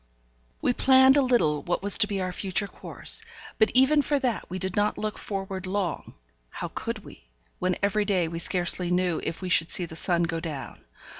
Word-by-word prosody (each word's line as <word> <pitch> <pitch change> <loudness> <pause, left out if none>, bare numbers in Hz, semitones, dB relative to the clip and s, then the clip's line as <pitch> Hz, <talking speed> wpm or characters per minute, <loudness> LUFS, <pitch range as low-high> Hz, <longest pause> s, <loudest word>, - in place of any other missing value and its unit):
We 245 - +2
planned 265 +1 +5
a 285 - +4
little 235 - +1
what 175 +2 -3
was 205 +1 +5
to 210 - +5
be 200 -2 -3
our 185 -1 -2
future 195 +2 -1
course; 450 - 0 0.4
but 220 - +4
even 275 +4 +5
for 290 +1 0
that 255 -5 -2
we 185 - -4
did 190 -1 -4
not 205 0 0
look 215 0 -4
forward 195 -2 -5
long; 185 -4 -3 0.3
how - - -6
could - - -6
we, - - -14 0.3
when 185 0 -1
every 205 +1 +1
day 185 -5 +1
we 165 +1 -5
scarcely 175 0 +1
knew 180 -2 0
if 165 - -5
we 185 - -3
should 170 -2 +3
see 180 - +4
the 160 - -10
sun 175 0 +1
go 165 -1 -2
down? 155 -5 -7
190 Hz, 205 wpm, -26 LUFS, 175-215 Hz, 0.4 s, planned